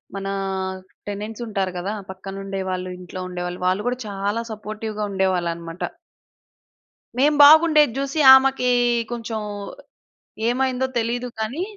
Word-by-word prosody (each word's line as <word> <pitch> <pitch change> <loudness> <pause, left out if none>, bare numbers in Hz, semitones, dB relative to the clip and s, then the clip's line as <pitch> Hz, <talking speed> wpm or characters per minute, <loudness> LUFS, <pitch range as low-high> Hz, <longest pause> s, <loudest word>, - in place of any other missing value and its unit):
మన 195 0 -4 0.8
టెనెంట్స్ 210 +3 -5
ఉంటారు 195 -3 -1
గదా! 190 +4 -3 0.2
పక్కన 190 +1 -8
ఉండేవాళ్ళు, 190 -2 -3
ఇంట్లో 180 +1 -8
ఉండేవాళ్ళు. 180 0 -5
వాళ్ళు 190 +3 +1
గూడా 250 - 0
చాలా 205 +2 -2
సపోర్టివ్‌గా 215 0 -5
ఉండేవాళ్ళన్నమాట. 175 -3 -1 1.4
మేము 295 +2 +4
బాగుండేది 305 -2 +7
జూసి 275 +3 -2
ఆమెకి 265 -1 +4 0.4
కొంచెం 230 -2 -4 1.1
ఏమైందో 260 +1 0
తెలీదు 240 +2 -2
గానీ 240 +11 -2
210 Hz, 105 wpm, -22 LUFS, 190-250 Hz, 1.4 s, బాగుండేది